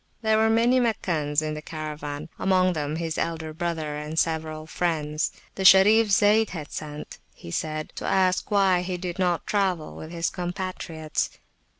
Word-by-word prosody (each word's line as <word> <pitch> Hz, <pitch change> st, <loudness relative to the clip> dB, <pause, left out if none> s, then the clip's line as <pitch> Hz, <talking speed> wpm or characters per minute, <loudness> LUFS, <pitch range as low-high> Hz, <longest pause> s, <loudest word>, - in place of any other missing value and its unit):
There 220 Hz, 0 st, +3 dB
were 220 Hz, 0 st, +4 dB
many 235 Hz, +3 st, +4 dB
Meccans 160 Hz, -10 st, 0 dB
in 155 Hz, 0 st, -2 dB
the 150 Hz, -, -6 dB
Caravan, 155 Hz, -1 st, -6 dB
among 185 Hz, -1 st, +3 dB
them 150 Hz, -1 st, -2 dB
his 165 Hz, -1 st, -3 dB
elder 160 Hz, -1 st, -3 dB
brother 160 Hz, -3 st, -3 dB
and 150 Hz, +2 st, -6 dB
several 160 Hz, -1 st, -1 dB
friends: 155 Hz, -3 st, -1 dB, 0.2 s
the 190 Hz, -, -4 dB
Sharif 210 Hz, +4 st, +7 dB
Zayd 210 Hz, +2 st, +4 dB
had 155 Hz, -5 st, -7 dB
sent, 150 Hz, -1 st, -7 dB, 0.2 s
he 85 Hz, -, -10 dB
said, 155 Hz, -, -3 dB
to -, -, -4 dB
ask 185 Hz, -1 st, +2 dB
why 195 Hz, -3 st, +3 dB
he 180 Hz, 0 st, -3 dB
did 175 Hz, 0 st, -5 dB
not 180 Hz, -2 st, +1 dB
travel 190 Hz, -6 st, 0 dB
with 155 Hz, -, -8 dB
his 170 Hz, 0 st, -2 dB
compatriots. 175 Hz, -3 st, -3 dB
170 Hz, 165 wpm, -25 LUFS, 155-190 Hz, 0.2 s, Sharif